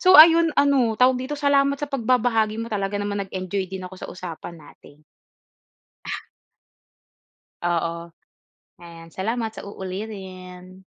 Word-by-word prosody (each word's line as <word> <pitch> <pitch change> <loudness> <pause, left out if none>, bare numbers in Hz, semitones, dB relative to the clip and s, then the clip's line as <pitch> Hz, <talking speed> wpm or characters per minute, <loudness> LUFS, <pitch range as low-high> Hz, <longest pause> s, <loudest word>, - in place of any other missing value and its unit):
So 370 0 +8
ayun, 330 +1 +9
ano, 265 -6 +3
tawag 255 +1 +4
dito? 285 +3 -4
Salamat 280 -1 +3
sa 290 +1 -5
pagbabahagi 230 -4 +1
mo, 230 0 -5
talaga 200 -1 -1
naman 205 0 -2
nag-enjoy 185 0 -3
din 190 -1 -6
ako 185 - -8
sa - - -7
usapan 175 -1 -8
natin. 150 -1 -17 1.1
Ah. - - -6 1.3
Oo, 170 0 -1 0.7
ayan. 165 -1 -12
Salamat, 225 +5 -2
sa 220 - -10
uulitin. 185 -2 -8
205 Hz, 125 wpm, -23 LUFS, 185-250 Hz, 1.3 s, ayun